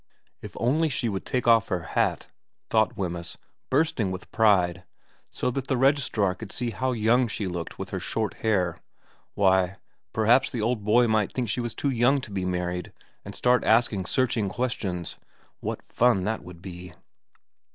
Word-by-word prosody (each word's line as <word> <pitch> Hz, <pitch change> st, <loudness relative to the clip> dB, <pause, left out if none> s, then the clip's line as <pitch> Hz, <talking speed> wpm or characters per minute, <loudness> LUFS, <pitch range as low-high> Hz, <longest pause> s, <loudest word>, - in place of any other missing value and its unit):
If -, -, -9 dB
only 155 Hz, +7 st, +2 dB
she 125 Hz, -4 st, -1 dB
would 95 Hz, -2 st, -4 dB
take 125 Hz, -2 st, -1 dB
off 115 Hz, -2 st, +5 dB
her 90 Hz, -2 st, -2 dB
hat, 85 Hz, -, 0 dB, 0.5 s
thought -, -, +2 dB
Wemyss, 85 Hz, -3 st, -4 dB, 0.3 s
bursting 135 Hz, -8 st, +1 dB
with 95 Hz, 0 st, -7 dB
pride, 95 Hz, -5 st, +3 dB, 0.5 s
so -, -, -2 dB
that 135 Hz, +1 st, -4 dB
the 130 Hz, -, +1 dB
registrar 130 Hz, -8 st, +2 dB
could 100 Hz, +1 st, -9 dB
see 120 Hz, -2 st, -2 dB
how 130 Hz, +4 st, -1 dB
young 120 Hz, +2 st, +3 dB
she 105 Hz, -1 st, -3 dB
looked 85 Hz, -2 st, -5 dB
with -, -, -6 dB
her -, -, -2 dB
short -, -, -2 dB
hair, 90 Hz, -6 st, +1 dB, 0.6 s
why, 95 Hz, -1 st, +3 dB, 0.3 s
perhaps 120 Hz, +5 st, +3 dB
the 125 Hz, -, -4 dB
old 110 Hz, 0 st, 0 dB
boy 120 Hz, +4 st, +4 dB
might 110 Hz, -3 st, +1 dB
think 125 Hz, -4 st, -2 dB
she 120 Hz, +4 st, -1 dB
was 120 Hz, -1 st, -4 dB
too 140 Hz, -, 0 dB
young 125 Hz, +3 st, +3 dB
to 110 Hz, -, -9 dB
be 95 Hz, -2 st, -2 dB
married 90 Hz, -1 st, -2 dB, 0.3 s
and -, -, -8 dB
start 125 Hz, -2 st, +3 dB
asking 110 Hz, -5 st, +2 dB
searching 120 Hz, -6 st, +1 dB
questions! 95 Hz, -8 st, -3 dB, 0.4 s
What -, -, -4 dB
fun 120 Hz, -6 st, +2 dB
that 110 Hz, +3 st, -2 dB
would 90 Hz, -1 st, -12 dB
be. 90 Hz, -2 st, -9 dB
110 Hz, 170 wpm, -26 LUFS, 95-125 Hz, 0.6 s, off